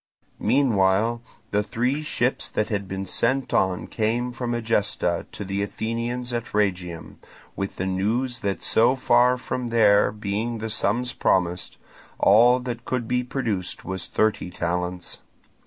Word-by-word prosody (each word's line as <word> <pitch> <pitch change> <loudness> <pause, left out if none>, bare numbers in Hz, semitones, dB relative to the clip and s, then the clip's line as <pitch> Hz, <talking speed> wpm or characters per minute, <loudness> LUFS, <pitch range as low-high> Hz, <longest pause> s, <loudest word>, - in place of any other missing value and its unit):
Meanwhile 115 -3 +2 0.3
the 105 - +2
three 125 +7 -1
ships 130 -4 -1
that 105 - -1
had 100 -3 -2
been 95 +1 -4
sent 130 +7 0
on 95 -1 +1
came 120 +3 -1
from 120 -1 -3
Egesta 105 -6 0
to 100 - -6
the 100 +1 -2
Athenians 115 +4 -3
at 120 -2 -4
Rhegium, 90 -5 -1 0.4
with 95 0 -4
the 95 - -3
news 115 +7 -1
that 100 -3 -2
so 120 +4 +4
far 125 -1 +4
from 125 0 -4
there 105 -3 +4
being 110 +3 -3
the 110 0 -4
sums 120 +4 0
promised, 90 -1 0 0.4
all 120 +5 +6
that 120 -2 -5
could 120 -3 -2
be 125 +1 +1
produced 110 -8 -3
was 95 -2 -4
thirty 110 -4 0
talents. 90 0 -3
110 Hz, 140 wpm, -24 LUFS, 95-120 Hz, 0.4 s, all